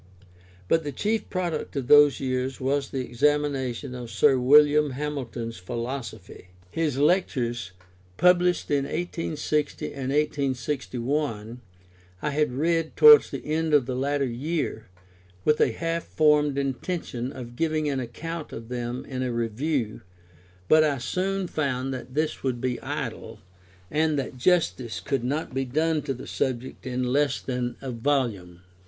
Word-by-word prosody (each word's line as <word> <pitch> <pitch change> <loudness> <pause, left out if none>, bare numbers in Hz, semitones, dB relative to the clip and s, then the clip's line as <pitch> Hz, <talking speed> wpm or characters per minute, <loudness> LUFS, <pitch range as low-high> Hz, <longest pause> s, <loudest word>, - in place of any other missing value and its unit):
But 165 0 +2
the 145 - -3
chief 215 - -1
product 175 -6 -3
of 135 -3 -2
those 145 +1 +6
years 130 0 -2
was 135 +1 0
the 130 -2 -3
Examination 135 -1 0
of 125 -2 -7
Sir 135 +1 +4
William 150 +2 +5
Hamilton's 125 -5 -4
Philosophy. 115 -1 -6 0.2
His 155 -2 -1
Lectures, 130 - +1 0.5
published 180 -2 +3
in 140 -1 +2
1860 155 -3 -2
and 135 -2 -4
1861, 135 -4 -1 0.6
I 150 - -2
had 150 -1 +1
read 165 +4 0
towards 450 -1 +9
the - - -6
end 155 0 +1
of 140 -4 +4
the 130 0 -3
latter 140 +2 0
year, 125 -2 -3 0.6
with 150 - +3
a - - +4
half 165 0 -2
formed 150 -2 +3
intention 135 -2 -3
of 120 -3 -9
giving 155 +1 0
an 140 -2 0
account 155 +7 -6
of 115 0 -8
them 120 0 -4
in 130 -1 -4
a 130 -1 -1
Review, 115 +1 -2 0.7
but 155 0 +6
I 145 -3 +1
soon 185 +10 -1
found 135 -5 -2
that 125 0 -8
this 155 +1 -1
would 130 -3 -1
be 125 -1 -2
idle, - - -5 0.5
and 155 0 +2
that 135 -2 -3
justice 125 - +1
could 130 +8 -2
not 140 +3 -2
be 135 +1 0
done 155 +4 0
to 135 - -3
the - - -9
subject 130 0 -3
in 125 0 -1
less 140 +3 +1
than 125 -2 -3
a 135 -2 -4
volume. 115 -9 -1
135 Hz, 145 wpm, -26 LUFS, 125-150 Hz, 0.7 s, towards